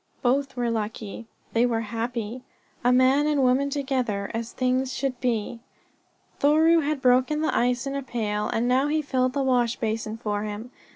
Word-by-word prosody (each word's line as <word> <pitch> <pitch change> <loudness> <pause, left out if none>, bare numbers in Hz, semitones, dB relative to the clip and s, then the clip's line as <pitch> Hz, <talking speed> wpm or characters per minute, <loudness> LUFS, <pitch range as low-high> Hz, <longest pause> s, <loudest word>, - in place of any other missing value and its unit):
Both 270 +2 +1
were 240 -2 -1
lucky. 220 0 -4 0.3
They 230 - +3
were 235 -2 +1
happy 230 +1 -4 0.4
a 245 - +4
man 260 +4 +4
and 295 -3 +2
woman 260 +3 +3
together, 255 -8 -2
as 230 +1 -4
things 255 +1 0
should 260 -2 -3
be. 235 -2 -1 0.8
Thoreau 315 +3 +5
had 295 -2 -2
broken 255 +5 +3
the 315 - 0
ice 245 +1 +1
in 275 - -3
a 280 - -2
pail 215 -5 -2
and 230 +2 0
now 260 +3 +3
he 310 +1 0
filled 255 -2 0
the 280 -1 0
wash 245 -3 +2
basin 220 -1 -3
for 210 -3 -2
him. 215 +3 -6
250 Hz, 175 wpm, -25 LUFS, 230-275 Hz, 0.8 s, Thoreau